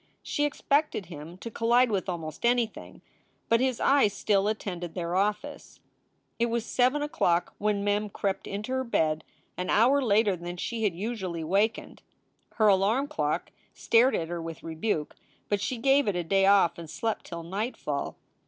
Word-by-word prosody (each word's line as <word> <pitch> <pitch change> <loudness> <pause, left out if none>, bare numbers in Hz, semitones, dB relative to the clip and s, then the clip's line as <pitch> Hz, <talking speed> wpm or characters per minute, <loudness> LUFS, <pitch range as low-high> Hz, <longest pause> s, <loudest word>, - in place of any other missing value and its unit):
She 295 - 0
expected 290 -6 0
him 165 +1 -10
to 230 +4 -8
collide 235 +2 +3
with 195 -2 -1
almost 160 -4 -5
anything, 235 -2 -1 0.5
but 230 - +4
his 255 -1 0
eyes 270 -8 +4
still 200 0 +1
attended 180 -6 -4
their 175 -1 -2
office. 205 +2 -2 0.6
It 235 - +2
was 235 -1 -1
seven 255 +5 +2
o - - -1
clock 175 - +1
when 205 -1 0
Mem 205 +1 0
crept 195 -1 -3
into 210 +5 -5
her 260 0 0
bed, 155 -10 0 0.3
an 180 - -3
hour 255 +6 +4
later 210 -4 +3
than 175 +1 -7
she 225 +4 -2
had 190 -5 0
usually 190 -5 -4
wakened. 200 +7 0 0.5
Her 215 -2 +3
alarm 210 +8 +3
clock 300 - -2 0.2
stared 240 +3 +4
at 165 -1 -2
her 175 -1 -4
with 165 -1 -7
rebuke, 160 -1 -2 0.3
but 205 -1 0
she 255 - -2
gave 270 +3 +3
it 200 - +1
a 175 - -1
day 195 +3 +3
off 195 -4 +4
and 165 -2 -9
slept 225 +6 -3
till 170 -1 -6
nightfall. 195 - -3
205 Hz, 170 wpm, -28 LUFS, 175-235 Hz, 0.6 s, but